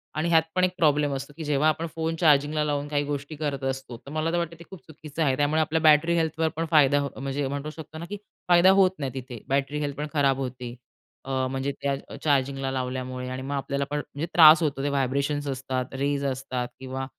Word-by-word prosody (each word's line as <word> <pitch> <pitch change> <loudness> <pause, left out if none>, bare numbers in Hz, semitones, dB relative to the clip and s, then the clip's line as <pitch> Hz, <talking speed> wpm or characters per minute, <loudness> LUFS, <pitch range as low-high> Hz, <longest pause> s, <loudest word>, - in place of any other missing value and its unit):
आणि 160 +2 0
ह्यात 165 -1 +6
पण 185 - +2
एक 185 - +3
प्रॉब्लेम 150 -3 +2
असतो, 140 +2 -7
की 160 - -5
जेव्हा 150 +1 +2
आपण 165 +2 -1
फोन 165 0 -1
चार्जिंगला 150 -1 +3
लावून 145 -1 -1
काही 145 -1 0
गोष्टी 145 +1 -4
करत 145 -3 -3
असतो, 130 -3 -6
तर 140 - -13
मला 155 +1 -1
तर 175 - 0
वाटतं 170 -1 -2
ते - - -10
खूप 190 - -11
चुकीचं 155 0 -8
आहे. 135 -3 +2
त्यामुळे 150 +2 +2
आपल्या 155 +1 0
बॅटरी 155 +2 +5
हेल्थवर 160 0 0
पण 165 +1 -1
फायदा, 145 -2 +5 0.2
म्हणजे 135 +1 -2
म्हणू 145 +2 -4
शकतो 155 0 -10
ना, 170 - -6
की 205 - -4 0.3
फायदा 175 +1 +6
होत 185 -1 +5
नाही 135 -2 -3
तिथे. 125 -2 -7
बॅटरी 140 +2 0
हेल्थ 145 -2 -3
पण 150 +1 -3
खराब 140 -3 +2
होते. 125 -2 -5 0.5
अ, 135 - -5 0.2
म्हणजे 135 +1 -2
त्या 140 -1 0 0.3
चार्जिंगला 135 -2 +1
लावल्यामुळे 130 0 -4
आणि 130 +1 -5
मग 140 +2 -4
आपल्याला 140 0 -2
पण 150 - 0
म्हणजे 145 +1 -5
त्रास 160 0 +9
होतो. 140 -2 -1
ते 145 - 0
व्हायब्रेशन्स 140 +1 -1
असतात, 130 -1 -2
रेज 140 +1 -1
असतात 130 -2 -3
किंवा 130 0 -5
145 Hz, 215 wpm, -26 LUFS, 135-155 Hz, 0.5 s, त्रास